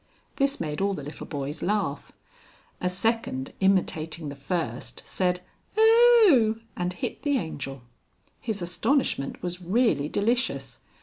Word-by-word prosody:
This 275 0 +2
made 150 0 -3
all 200 0 +1
the 145 - -6
little 150 +2 -8
boys 145 0 -4
laugh. 190 -9 -1 0.7
A 180 - +1
second 190 - -1
imitating 165 -5 +1
the 140 - -7
first, 135 -3 -4
said 180 -1 0 0.4
"Oh!" 445 - +6 0.2
and 180 0 -1
hit 180 - -5
the 285 -1 +1
Angel. 135 - -5 0.6
His 210 -6 -3
astonishment 180 - 0
was 180 0 -4
really 180 - +2
delicious. 235 +7 -1
180 Hz, 125 wpm, -26 LUFS, 150-230 Hz, 0.7 s, Oh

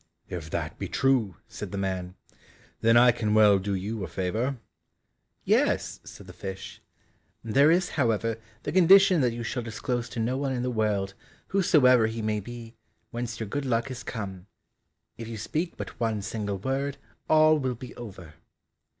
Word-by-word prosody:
"If 80 -3 -6
that - - -4
be - - -3
true," 125 -9 +1
said - - -7
the 100 - -4
man, 95 -2 -3 0.6
"then 115 +1 +4
I 120 +1 +7
can 110 -2 -1
well 105 -2 +6
do 100 +1 -2
you 100 +3 -4
a - - -3
favour." 110 +9 -2 0.9
"Yes," - - +1
said 100 - -12
the 90 - -11
fish, 95 0 -8 0.6
"there 135 +7 +4
is, 175 +2 +3
however, 115 -4 0 0.3
the 145 - -3
condition 185 0 +6
that 125 -2 +2
you 120 0 -5
shall 120 +2 -3
disclose 120 +2 -3
to 115 - -6
no 120 +3 0
one 135 -1 -1
in 125 -1 -2
the 125 - -1
world, 105 -4 0 0.4
whosoever 130 - +5
he 110 0 -4
may 105 0 0
be, 115 +2 -9 0.4
whence 120 -2 -4
your 110 - -2
good 140 +8 -3
luck 120 +1 0
has 125 -2 -6
come, 100 -5 -6 0.7
if 115 - -6
you 115 -1 -6
speak 155 - -3
but - - -7
one 110 -3 -1
single 100 0 -3
word, 135 +6 -2 0.3
all 155 0 +5
will 130 -3 -1
be 125 +2 -10
over." 95 -9 -10
115 Hz, 175 wpm, -27 LUFS, 105-130 Hz, 0.9 s, I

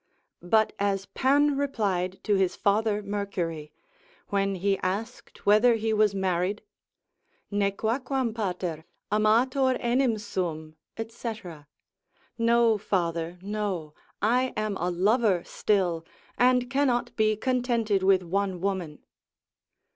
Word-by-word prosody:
But 215 +5 +2
as 195 -1 0
Pan 285 +5 +2
replied 195 -10 -1
to 210 - +1
his 190 -2 +2
father 210 0 +1
Mercury, 185 -7 -4 0.6
when 195 -1 0
he 195 +1 0
asked 215 +6 -5
whether 215 +4 +5
he 220 0 -1
was 210 -2 +3
married, 190 +1 -1 0.9
Nequaquam 225 +5 -1
pater, 180 -7 -3 0.3
amator 250 +5 +3
enim 240 -1 +1
sum 160 -7 -4 0.3
&c. 230 0 -5 1.0
No, 230 -1 +3
father, 170 -3 -1
no, 195 -7 -3 0.3
I 250 +4 +2
am 215 -1 -1
a 175 - -1
lover 195 +1 +2
still, 180 -6 0 0.3
and 250 0 +3
cannot 265 -2 0
be 215 -1 +2
contented 235 -4 0
with 190 -1 +4
one 190 +1 -1
woman. 180 -5 -3
205 Hz, 110 wpm, -27 LUFS, 185-230 Hz, 1.0 s, whether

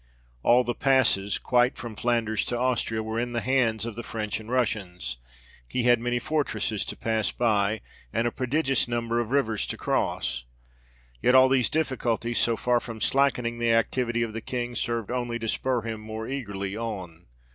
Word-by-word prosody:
All 120 - +5
the 120 - -1
passes, 130 -8 +3
quite 125 0 +2
from 115 -2 -7
Flanders 115 -2 +1
to 120 - -1
Austria, 120 -3 0
were 110 +1 -2
in 120 0 -2
the 120 - +1
hands 115 -4 +1
of 115 -3 -5
the 120 - -4
French 110 -3 -3
and 110 0 -11
Russians: 100 - -1 0.5
he 125 - -1
had 120 -1 +5
many 120 +1 0
fortresses 115 -7 -1
to - - -5
pass 110 -2 0
by; 110 -3 +1 0.3
and 115 - 0
a 120 - +1
prodigious 135 +1 +1
number 120 0 -1
of 120 -2 -2
rivers 115 -6 +1
to - - -3
cross. 60 0 -1 0.8
Yet 125 - +4
all 130 0 +7
these 130 -2 +3
difficulties 120 -6 0
so 115 -1 +2
far 125 +1 +2
from 115 -2 -8
slackening 125 -3 +1
the 115 -1 +3
activity 120 +1 +1
of 115 -2 -4
the 115 - -4
King, 120 0 -3
served 115 -1 -2
only 120 -1 -1
to 115 -1 -4
spur 125 +1 0
him 110 -1 -4
more 110 +1 -6
eagerly 100 -7 -4
on. 95 - -6
115 Hz, 180 wpm, -26 LUFS, 110-125 Hz, 0.8 s, all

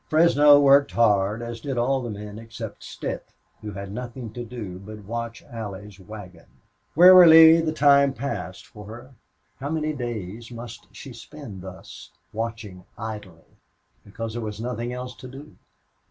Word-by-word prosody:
Fresno 150 -2 +6
worked 140 0 +5
hard, 105 -1 +2
as 120 -1 -7
did 135 -1 -4
all 130 +3 +1
the 120 - -5
men 105 0 -8
except 115 -1 -9
Stitt, - - -6 0.3
who 105 -1 -7
had 100 0 -7
nothing 120 0 -7
to 120 - -6
do 110 -6 -8
but 105 +2 -11
watch 115 +1 -5
Allie's 105 -5 -9
wagon. 100 -2 -12 0.5
Wearily 165 -2 +9
the 160 -1 -1
time 140 -2 +4
passed 135 -8 -6
for 105 -1 -13
her. 120 +5 -11 0.5
How 140 +2 -4
many 155 -1 -2
days 115 -4 -6
must 115 -1 -10
she 135 - -11
spend 115 -4 -11
thus, 90 -9 -11 0.2
watching 110 -4 -6
idly, 105 -7 -9 0.4
because 110 +2 -7
there 120 - -4
was 105 -1 -6
nothing 120 0 -4
else 125 0 -6
to 130 - -10
do? 140 +4 -12
115 Hz, 155 wpm, -24 LUFS, 105-135 Hz, 0.5 s, Wearily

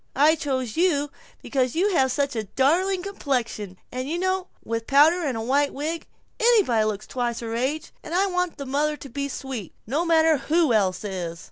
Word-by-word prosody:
I 295 +3 +5
chose 260 -7 -2
you 295 -5 +2 0.3
because 255 -1 0
you 390 +5 +2
have 265 -5 +3
such 280 0 0
a 220 -1 -2
darling 360 - +1
complexion, 240 - -3
and 255 +2 -4
you 335 - -1
know 375 0 0 0.2
with 230 0 -3
powder 310 +6 +5
and 265 -6 -1
a - - -3
white 280 +4 +1
wig, 315 +4 -3 0.3
anybody 410 - +4
looks 215 -1 -2
twice 240 -2 -2
her 225 -1 -4
age, 270 +7 -2
and 330 - -4
I 385 +2 +4
want 360 -2 -1
the 280 - -6
mother 295 +3 0
to 280 - -10
be 280 +3 -3
sweet, 260 - -6
no 285 +9 0
matter 325 -2 +4
who 305 0 +2
else 190 -3 +1
is." 175 -5 -4
280 Hz, 195 wpm, -24 LUFS, 235-330 Hz, 0.3 s, I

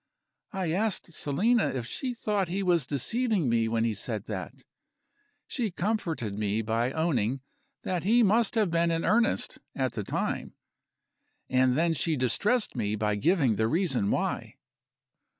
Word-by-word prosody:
I 185 -5 -2
asked 190 -2 -1
Selina 210 - +2
if 125 -3 -3
she 250 - -3
thought 205 -4 -1
he 190 +4 -2
was 170 -7 +2
deceiving 205 - 0
me 115 -1 +2
when 115 0 0
he 115 -1 +1
said 105 0 -4
that. - - -6 0.8
She 235 -5 -2
comforted 175 - -2
me 105 +1 -1
by 115 +3 0
owning 135 -6 0 0.4
that 180 -3 -2
he 230 +5 +4
must 225 +3 +3
have 210 -6 +2
been 170 0 +2
in 165 0 0
earnest, 235 +3 +2 0.2
at - - -1
the - - -3
time - - -3 1.0
and 130 0 +3
then 165 +1 +2
she 160 +2 0
distressed 205 - +1
me 105 -3 -1
by 105 0 0
giving 135 - +2
the 110 - +2
reason 135 - +1
why. - - -2
165 Hz, 150 wpm, -28 LUFS, -, 1.0 s, he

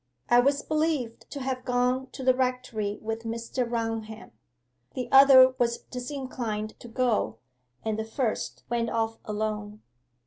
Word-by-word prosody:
I 240 - +6
was 280 +3 +2
believed 305 -7 -1
to 285 - -6
have 260 -1 -3
gone 250 +1 +1
to 265 - -7
the 255 0 +5
rectory 250 -5 -1
with 225 +1 -2
Mr. 230 +2 -3
Raunham. 225 -2 -4 0.6
The 250 -1 -3
other 265 -1 +8
was 235 -1 +2
disinclined 245 -5 -5
to - - -11
go, 240 - 0 0.5
and 220 -1 -1
the - - -1
first 225 0 -2
went 235 -1 0
off 225 0 -1
alone. 210 0 -3
240 Hz, 140 wpm, -27 LUFS, 225-255 Hz, 0.6 s, other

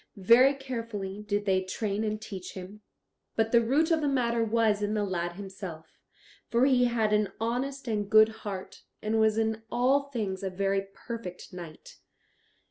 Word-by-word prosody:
Very 240 +8 +6
carefully 230 -7 -5
did 205 -1 -2
they 190 -2 +2
train 200 +2 -2
and 215 0 -2
teach 190 -4 -7
him, 190 +3 -9 0.5
but 225 0 +1
the 235 - +6
root 290 +8 +2
of 320 -1 +3
the 295 - +1
matter 235 -4 +1
was 220 -2 +2
in 210 +1 0
the 210 - +1
lad 175 -3 -2
himself, 190 -4 -9 0.5
for 235 +2 +3
he 255 -2 +4
had 225 -3 +1
an 210 -1 +2
honest 255 +4 -2
and 210 -3 -1
good 215 0 +7
heart, 195 -3 -6 0.2
and 220 +1 +1
was 220 0 +3
in 220 0 0
all 270 +4 +2
things 205 -8 -3
a 195 - -2
very 195 +1 -1
perfect 225 -8 -7
knight. 170 -3 -10
215 Hz, 170 wpm, -29 LUFS, 195-235 Hz, 0.5 s, good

